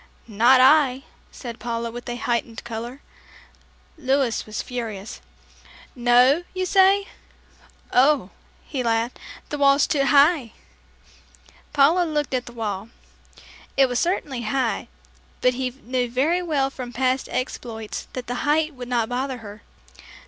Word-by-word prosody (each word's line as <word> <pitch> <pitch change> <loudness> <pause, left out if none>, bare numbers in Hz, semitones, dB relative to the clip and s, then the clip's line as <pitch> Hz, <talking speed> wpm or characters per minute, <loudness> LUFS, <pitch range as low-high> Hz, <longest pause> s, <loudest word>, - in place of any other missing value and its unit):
"Not 235 +4 +5
I," 270 -1 +5 0.3
said 235 -3 -8
Paula, 235 -1 -3
with 240 +1 -8
a 240 - -3
heightened 235 -1 -2
color. 235 +4 -6 1.0
Louis 265 -4 +1
was 215 - -4
furious. 225 -5 -6 0.7
"No, 245 +5 +4
you 370 0 -1
say? 390 +1 +4 0.9
Oh," 260 -5 +3 0.3
he 270 -4 -3
laughed, 230 0 -1 0.3
"the 295 - -4
wall's 280 0 +5
too 275 -3 +1
high." 285 -4 +4 1.2
Paula 305 +5 +4
looked 300 -4 -2
at 250 -1 -1
the - - -8
wall. 215 -3 -4 0.9
It 270 - +6
was 245 -1 -1
certainly 300 -8 -1
high, 235 +1 -1 0.5
but 250 - +3
he 255 0 -2
knew 250 -1 -3
very 295 +9 +1
well 285 -6 0
from 250 -2 -7
past 260 +1 0
exploits 230 -3 -5
that 255 -1 -5
the 245 +1 -4
height 310 +1 +1
would 250 -2 -8
not 235 -3 +1
bother 255 +2 -3
her. 210 -2 -11
255 Hz, 135 wpm, -23 LUFS, 235-280 Hz, 1.2 s, It